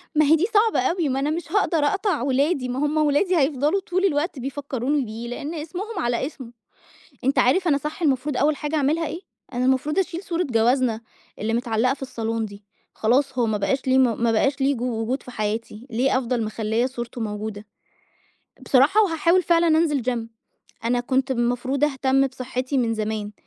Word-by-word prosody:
ما 305 Hz, 0 st, +5 dB
هي 310 Hz, +3 st, +6 dB
دي 335 Hz, +5 st, +1 dB
صعبة 435 Hz, +1 st, +4 dB
أوي، 315 Hz, +4 st, 0 dB
ما 265 Hz, +1 st, 0 dB
أنا 285 Hz, -, 0 dB
مش 320 Hz, 0 st, -4 dB
هاقدر 395 Hz, -4 st, +2 dB
أقطع 350 Hz, -, +1 dB
ولادي، 275 Hz, 0 st, +1 dB
ما 250 Hz, -, -2 dB
هُم 295 Hz, +2 st, 0 dB
ولادي 310 Hz, +5 st, +2 dB
هيفضلوا 290 Hz, +5 st, +2 dB
طول 370 Hz, +2 st, 0 dB
الوقت 300 Hz, -3 st, 0 dB
بيفكروني 275 Hz, 0 st, -2 dB
بيه، 225 Hz, +2 st, -7 dB
لإن 285 Hz, +6 st, -5 dB
اسمهم 355 Hz, +8 st, -5 dB
على 240 Hz, +1 st, 0 dB
اسمه، 265 Hz, -5 st, -8 dB, 0.7 s
أنت 270 Hz, +1 st, +2 dB
عارف 340 Hz, +9 st, +3 dB
أنا 285 Hz, -, +3 dB
صح 300 Hz, +5 st, -6 dB
المفروض 280 Hz, -2 st, 0 dB
أوّل 295 Hz, +2 st, +2 dB
حاجة 295 Hz, +2 st, -3 dB
أعملها 305 Hz, +2 st, +1 dB
إيه، 335 Hz, -, -5 dB, 0.3 s
أنا 245 Hz, +1 st, 0 dB
المفروض 265 Hz, +7 st, +1 dB
أشيل 370 Hz, 0 st, -2 dB
صورة 345 Hz, 0 st, -1 dB
جوازنا 240 Hz, -2 st, +1 dB, 0.4 s
اللي 220 Hz, +2 st, -1 dB
متعلّقة 235 Hz, +1 st, +1 dB
في 275 Hz, -, -12 dB
الصالون 225 Hz, -3 st, -3 dB
دي، 205 Hz, 0 st, -11 dB, 0.3 s
خلاص، 255 Hz, +4 st, +1 dB
هو 235 Hz, -, +3 dB
ما 215 Hz, -1 st, 0 dB
بقاش 260 Hz, +7 st, -1 dB
ليه 260 Hz, 0 st, +4 dB
م 240 Hz, -3 st, +2 dB
ما 230 Hz, -, +3 dB
بقاش 270 Hz, +5 st, +1 dB
ليه 275 Hz, +1 st, +2 dB
جو 240 Hz, -2 st, -2 dB
وجود 250 Hz, +5 st, -2 dB
في 250 Hz, -, -10 dB
حياتي، 220 Hz, +2 st, -4 dB
ليه 255 Hz, +3 st, +1 dB
أفضل 245 Hz, -2 st, -1 dB
مخلّية 220 Hz, +2 st, -1 dB
صورته 240 Hz, -2 st, -5 dB
موجودة، 210 Hz, 0 st, -5 dB, 1.0 s
بصراحة، 285 Hz, +12 st, +5 dB
وهاحاول 340 Hz, 0 st, +2 dB
فعلًا 340 Hz, 0 st, +3 dB
أنزل 315 Hz, -3 st, +2 dB
gym، 235 Hz, -2 st, -2 dB, 0.6 s
أنا 245 Hz, +1 st, +1 dB
كنت 260 Hz, +2 st, 0 dB
المفروض 245 Hz, +3 st, 0 dB
أهتم 270 Hz, -1 st, +2 dB
بصحتي 260 Hz, +1 st, -3 dB
من 230 Hz, -2 st, +1 dB
زمان، 215 Hz, -1 st, -3 dB
265 Hz, 185 wpm, -23 LUFS, 240-300 Hz, 1.0 s, هي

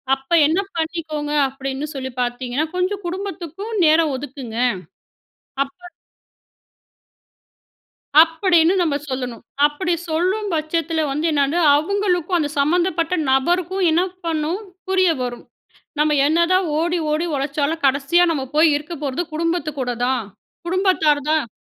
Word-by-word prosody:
அப்ப, 270 Hz, 0 st, -21 dB, 0.2 s
என்ன 325 Hz, +5 st, +1 dB, 0.2 s
பண்ணிக்கோங்க 315 Hz, -2 st, -3 dB, 0.2 s
அப்படீன்னு 270 Hz, +1 st, -5 dB
சொல்லி 260 Hz, -1 st, -4 dB
பார்த்தீங்கன்னா, 245 Hz, +4 st, -2 dB
கொஞ்சம் 380 Hz, +2 st, -1 dB
குடும்பத்துக்கும் 380 Hz, +2 st, -6 dB
நேரம் 310 Hz, -1 st, +4 dB
ஒதுக்குங்க." 260 Hz, -4 st, -8 dB, 1.1 s
அப்ப 275 Hz, -, -17 dB, 2.5 s
அப்படீன்னு 335 Hz, +1 st, +3 dB
நம்ப 310 Hz, -4 st, +1 dB
சொல்லணும். 250 Hz, -3 st, -4 dB, 0.2 s
அப்படி 345 Hz, +5 st, -2 dB, 0.2 s
சொல்லும் 370 Hz, +6 st, 0 dB
பட்சத்தில 320 Hz, +1 st, -1 dB
வந்து 300 Hz, +4 st, -1 dB
என்னது, 285 Hz, +2 st, +1 dB, 0.2 s
அவுங்களுக்கும் 360 Hz, +1 st, 0 dB
அந்த 295 Hz, -3 st, -1 dB
சம்மந்தப்பட்ட 340 Hz, +3 st, +1 dB, 0.2 s
நபருக்கும் 350 Hz, +7 st, +1 dB
என்ன 330 Hz, +3 st, +3 dB, 0.2 s
பண்ணும்? 325 Hz, +3 st, -1 dB, 0.3 s
புரிய 375 Hz, -2 st, +3 dB
வரும். 245 Hz, -1 st, -5 dB, 0.6 s
நம்ம 300 Hz, 0 st, +3 dB
என்னதான் 340 Hz, +4 st, +2 dB
ஓடி 345 Hz, +2 st, 0 dB
ஓடி 310 Hz, +3 st, 0 dB
உழைச்சாலும் 285 Hz, +3 st, -1 dB
கடைசியா 280 Hz, +6 st, +3 dB
நம்ம 280 Hz, -4 st, -2 dB
போய் 315 Hz, +1 st, +6 dB
இருக்க 300 Hz, +4 st, -6 dB
போறது 275 Hz, +5 st, -1 dB
குடும்பத்து 335 Hz, 0 st, -1 dB
கூட 245 Hz, -, -1 dB, 0.2 s
தான். 255 Hz, -4 st, 0 dB, 0.4 s
குடும்பத்தார் 355 Hz, -5 st, +2 dB
தான். 310 Hz, -7 st, +1 dB
320 Hz, 115 wpm, -20 LUFS, 285-350 Hz, 2.5 s, போய்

